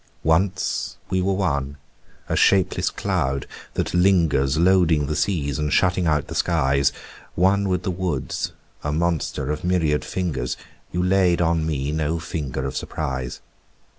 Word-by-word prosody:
Once 90 +5 0
we 95 -1 +2
were 95 +1 +1
one, 70 -7 -1 0.5
a - - -1
shapeless 95 -2 +3
cloud 65 +1 -1 0.3
that - - -1
lingers 80 -7 +3
Loading 85 -4 +4
the 75 +2 -2
seas 75 -6 0
and 75 -1 -1
shutting 90 -1 +2
out 75 -2 +2
the - - -8
skies, 70 -4 +2 0.4
One 95 +2 +3
with 90 -1 0
the 95 - -1
woods, 90 -7 -2 0.3
a 75 - -1
monster 80 -3 -1
of 75 - -4
myriad 85 -5 +1
fingers, 85 -9 -2 0.3
You 90 +1 0
laid 90 -2 +3
on 80 -2 +1
me 70 -2 -1
no 80 +1 0
finger 75 -6 -4
of 65 - -4
surprise. 65 -2 -4
80 Hz, 145 wpm, -23 LUFS, 70-90 Hz, 0.5 s, Loading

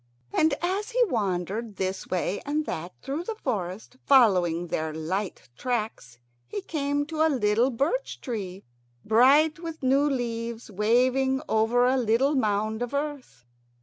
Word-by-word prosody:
And 310 -2 +3
as 385 +5 -1
he - - +3
wandered 205 - -2
this 190 0 -3
way 185 +2 -1
and 300 +2 -1
that 170 - -4
through 285 +5 -3
the 445 +5 -4
forest, 215 - -4
following 180 -10 +4
their 160 -2 -2
light 185 +5 -3
tracks, 215 - -3 0.3
he - - -4
came 290 -4 -1
to 315 +1 -3
a 320 - +5
little 235 -2 +2
birch 285 - -1
tree, 200 -7 -5 0.4
bright 280 +8 +5
with 330 -3 -7
new 270 +2 +3
leaves, 235 -3 -3
waving 255 +6 +2
over 225 +3 +3
a 260 +1 +3
little 250 +4 +2
mound 215 -3 0
of 245 +3 -3
earth. 285 - -5
240 Hz, 145 wpm, -26 LUFS, 205-285 Hz, 0.4 s, a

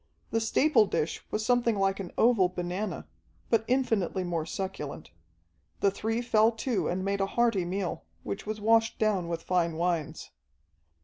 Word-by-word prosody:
The 225 - +1
staple 225 0 +3
dish 160 -3 -2
was 215 +1 -2
something 240 -3 +2
like 195 0 +1
an 190 -3 -6
oval 225 -6 +4
banana, 180 +3 -4 0.4
but 230 -1 +3
infinitely 225 -8 +1
more 170 -3 -2
succulent. 160 - -5 0.7
The 200 - +4
three 225 +4 -2
fell 225 -1 +4
to 225 - -1
and 185 +2 -2
made 200 0 0
a 195 - +1
hearty 230 -4 +1
meal, 185 0 -3 0.2
which 200 - -5
was 215 0 -3
washed 225 +1 +3
down 205 -5 +1
with 165 -1 -4
fine 170 -3 +1
wines. 165 -2 -2
200 Hz, 160 wpm, -28 LUFS, 180-225 Hz, 0.7 s, oval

